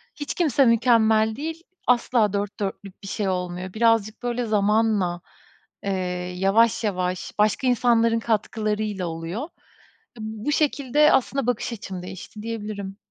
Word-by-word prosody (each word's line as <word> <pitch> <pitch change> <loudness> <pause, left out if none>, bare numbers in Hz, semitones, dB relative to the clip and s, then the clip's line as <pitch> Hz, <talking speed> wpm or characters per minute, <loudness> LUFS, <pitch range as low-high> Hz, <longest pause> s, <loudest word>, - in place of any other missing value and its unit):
hiç 290 -1 -4
kimse 285 -6 +3
mükemmel 220 -2 +4
değil. 320 +5 -5 0.2
Asla 235 -4 +3
4 205 0 -3
4'lük 200 0 -5
bir - - -7
şey 205 +1 -2
olmuyor. 180 0 -3
Birazcık 225 -1 +2
böyle 245 0 -1
zamanla, 210 -4 +1 0.6
eee, 200 - -1 0.5
yavaş 215 +5 +3
yavaş 185 -2 -2
başka 215 +6 +2
insanların 230 -2 +3
katkılarıyla 215 -3 -1
oluyor. 165 +6 -4
Iıı, 305 - -6 0.7
bu 220 +5 -3
şekilde 295 0 +3
aslında 270 0 +1
bakış 245 0 -1
açım 190 -5 -6
değişti 185 +3 -9
diyebilirim. 210 -3 -5
220 Hz, 130 wpm, -24 LUFS, 200-240 Hz, 0.7 s, mükemmel